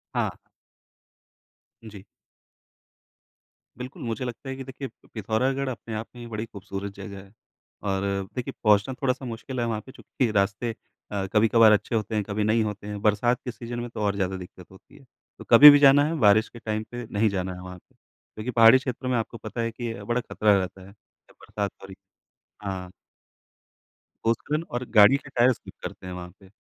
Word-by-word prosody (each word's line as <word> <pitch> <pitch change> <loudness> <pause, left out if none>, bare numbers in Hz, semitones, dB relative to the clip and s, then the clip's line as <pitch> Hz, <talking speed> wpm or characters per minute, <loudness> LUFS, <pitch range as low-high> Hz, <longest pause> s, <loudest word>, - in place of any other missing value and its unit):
हाँ। - - 0 1.5
जी। 100 -2 -12 1.7
बिल्कुल, 125 +1 -8
मुझे 115 +1 -3
लगता 125 +2 -7
है 135 - -4
कि 135 - -7
देखिए 130 +1 -7 0.3
पिथौरागढ़ 130 +6 -1
अपने 115 -2 -7
आप 110 +1 -4
में 120 - -10
ही 120 - -8
बड़ी 110 0 -4
खूबसूरत 100 -1 -7
जगह 100 -1 -9
है। 95 - -19 0.5
और 95 -1 -1 0.3
देखिए 125 - -4
पहुँचना 105 +3 +3
थोड़ा-सा 130 0 -1
मुश्किल 120 +2 -6
है 120 - 0
वहाँ 110 -2 -2
पे 130 - -11
चूँकि 130 -2 -2
रास्ते 100 +3 0 0.4
अ, 100 -2 -2
कभी-कभार 110 0 +6
अच्छे 105 +2 +1
होते 110 0 -2
हैं, 105 - +1
कभी 105 +1 -2
नहीं 110 +1 +2
होते 105 -1 -5
हैं, 105 -1 -5
बरसात 115 +4 +2
के 125 - -3
सीज़न 120 +1 -7
में 120 - -5
तो 110 - -6
और 100 -1 +1
ज़्यादा 95 -1 -1
दिक्कत 90 0 -11
होती 95 - -18
है। - - -17 0.4
तो - - -8
कभी 150 - +11
भी 145 0 +8
जाना 140 0 +7
है, 165 +2 -1
बारिश 110 -1 +5
के 120 - -12
टाइम 110 -1 -3
पे 120 0 -6
नहीं 105 +1 +2
जाना 95 -1 -3
है 90 - -9
वहाँ 90 0 -9
पे, - - -26
क्योंकि 110 +4 -10
पहाड़ी 115 +2 +7
क्षेत्रों 130 0 -4
में 125 - +1
आपको 115 +1 -4
पता 110 +2 -5
है 115 0 -1
कि 120 +2 -10
ये 100 -2 -9
बड़ा 120 +3 -1
ख़तरा 105 -3 +2
रहता 95 0 -4
है, 100 - -14
जब 105 - -28
बरसात 100 -1 -4
हो - - -9
रही। 95 - -11 0.7
हाँ। 95 -2 -5 1.3
पोस्करन 145 +8 0
और 120 +1 -3
गाड़ी 105 +7 +8
के 140 - -13
टायर्स 125 -1 +3
ठीक - - -11
करते 90 - -7
हैं 90 - -6
वहाँ 90 0 -7
पे। 95 - -18
110 Hz, 200 wpm, -25 LUFS, 100-120 Hz, 1.7 s, कभी